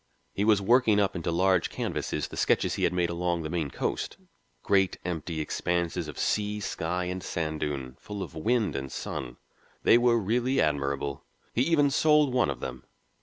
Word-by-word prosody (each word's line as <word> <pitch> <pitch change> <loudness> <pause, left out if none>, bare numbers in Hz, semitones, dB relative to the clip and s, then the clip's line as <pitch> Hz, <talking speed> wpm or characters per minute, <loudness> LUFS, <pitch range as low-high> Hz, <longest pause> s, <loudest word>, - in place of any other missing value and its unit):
He 100 - -1
was 105 -2 +4
working 115 -1 +4
up 100 -2 +1
into 85 -1 -2
large 90 +1 +2
canvases - - -3
the - - -8
sketches - - +2
he - - +1
had - - +2
made 90 -1 0
along 85 -1 -1
the 75 - -4
Maine 80 -5 -1
coast, - - -3 0.5
great, 95 -3 +2
empty 85 -2 -3
expanses 85 +2 -1
of 75 - -8
sea, 105 0 0
sky, 90 -2 -2
and 90 +1 -3
sand 80 -3 -3
dune, 70 -4 -3
full 105 -2 -6
of - - -9
wind 105 +1 0
and 65 -1 -4
sun. 60 -2 -5 0.5
They 120 - +6
were 120 -1 +4
really 120 +5 +1
admirable. 70 -1 -1 0.3
He 120 - +1
even 145 -1 +3
sold 150 -2 +4
one 125 -1 +3
of - - -4
them. 65 -1 -6
90 Hz, 180 wpm, -28 LUFS, 80-110 Hz, 0.5 s, They